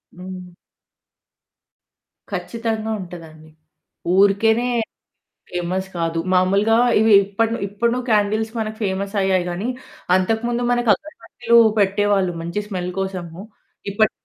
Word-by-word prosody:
హ్మ్. 185 0 -8 1.8
ఖచ్చితంగా 225 -1 -3
ఉంటదండి. 160 -3 -11 0.7
ఊరికేనే 220 +4 +3 0.8
ఫేమస్ 180 +2 -3
కాదు. 165 0 -1
మామూలుగా 195 +5 +3 0.2
ఇవి 220 -1 +4
ఇప్పడును 225 +4 -1
ఇప్పడున 235 +4 0
క్యాండిల్స్ 215 +1 +1
మనకు 215 0 -3
ఫేమస్ 195 +1 -2
అయ్యాయిగానీ 185 +2 0 0.5
అంతకుముందు 225 +5 0
మనకు 240 -1 +1
అగర్బత్తులు 235 -5 0 0.2
పెట్టేవాళ్ళు. 200 -2 +2
మంచి 170 +5 -3
స్మెల్ 180 -3 -3
కోసము. 185 -2 -5 0.5
ఇప్పుడు 215 +2 +2
200 Hz, 95 wpm, -21 LUFS, 185-220 Hz, 1.8 s, ఇవి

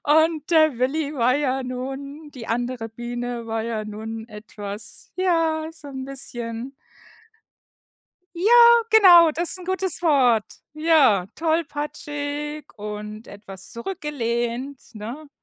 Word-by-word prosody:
Und, 315 +1 +3
der 310 -6 +4
Willi 285 +3 0
war 250 0 +3
ja 270 -2 0
nun 275 +4 -6
die 245 -5 -9
andere 240 0 -2
Biene 240 +1 -5
war 225 0 -1
ja 220 -2 -3
nun 220 +2 -7
etwas, 210 -1 -8
ja, 330 -4 +1
so 300 -3 -12
'n 265 -1 -6
bisschen 245 -1 -6 1.6
ja, 380 +6 +1 0.4
genau, 355 -7 +8
das 340 +2 -1
ist - - -3
'n 365 - -10
gutes 375 -2 -1
Wort. 255 -9 +4 0.3
Ja, 300 - +4
tollpatschig 295 -2 -3
und 210 +1 -7
etwas 195 -2 -9
zurückgelehnt, 245 -2 -3
ne? 240 +9 -7
270 Hz, 115 wpm, -23 LUFS, 230-310 Hz, 1.6 s, genau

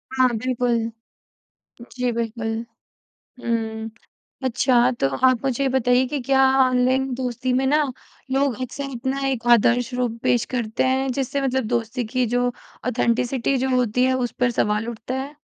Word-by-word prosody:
हाँ, 255 -1 +5
बिल्कुल। 245 0 0 1.1
जी, 250 -1 -1
बिल्कुल। 230 -1 -3 0.9
हुँ, 225 -1 -2 0.5
अच्छा 250 0 +3
तो - - +3 0.2
आप 255 -2 +3
मुझे 270 +1 0
ये 270 - +2
बताइए 255 0 +3
कि 290 +2 -3
क्या 270 +1 +3 0.2
ऑनलाइन 255 +1 +2
दोस्ती 250 0 -2
में 265 +1 +1
ना, 300 +2 +3 0.5
लोग 270 -3 +1
अक्सर 255 +2 -4
अपना 265 +3 -2
एक 240 -3 -2
आदर्श 240 +2 +2
रूप 245 -2 -2
पेश 240 - +2
करते 220 -2 -1
हैं 265 +1 +1
जिससे 275 +2 -2
मतलब 265 -2 0
दोस्ती 235 +2 -2
की 255 -1 +2
जो 245 0 +2 0.4
ऑथेंटिसिटी 245 +2 0
जो 260 +1 0
होती 250 0 +2
है, 260 0 +3
उस 250 -2 -1
पर 245 -1 +3
सवाल 210 +2 +1
उठता 235 +2 -5
है? 285 +2 -8
250 Hz, 155 wpm, -22 LUFS, 235-260 Hz, 1.1 s, हाँ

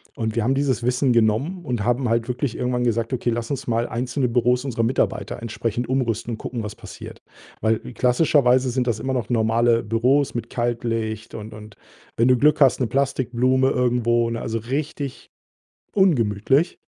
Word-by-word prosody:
und 110 -1 -3
wir 115 - +1
haben 130 +4 +1
dieses 135 -5 0
Wissen 125 +2 +2
genommen 120 - +1
und 120 -6 -2
haben 120 +2 +1
halt 115 +1 +1
wirklich 125 0 -2
irgendwann 125 0 -1
gesagt: 115 -1 0
„Okay, 120 -1 0
lass 115 +1 -3
uns 135 -2 -4
mal 115 0 +1
einzelne 125 +2 -1
Büros 125 +1 +2
unserer 115 -3 -1
Mitarbeiter 120 0 -1
entsprechend 115 +1 -3
umrüsten 120 -3 -1
und 110 - -5
gucken, 120 0 -5
was 105 0 -6
passiert“, - - -11 0.4
weil 110 0 +2
klassischerweise 125 0 +2
sind 125 0 -1
das 110 -2 0
immer 130 +3 -2
noch 120 -4 -2
normale 115 0 +2
Büros 125 +6 +1
mit 120 -1 -4
Kaltlicht 115 -2 -2
und 110 0 -8
und 105 -1 -12 0.4
wenn 115 - +3
du 125 - +5
Glück 150 +3 +3
hast, 135 -2 +5
'ne 125 - +1
Plastikblume 130 -1 +1
irgendwo, 120 -1 +1
ne? 115 - -4
Also 115 -1 -2
richtig 140 +3 -4 0.7
ungemütlich. 135 - +2
120 Hz, 175 wpm, -22 LUFS, 115-130 Hz, 0.7 s, du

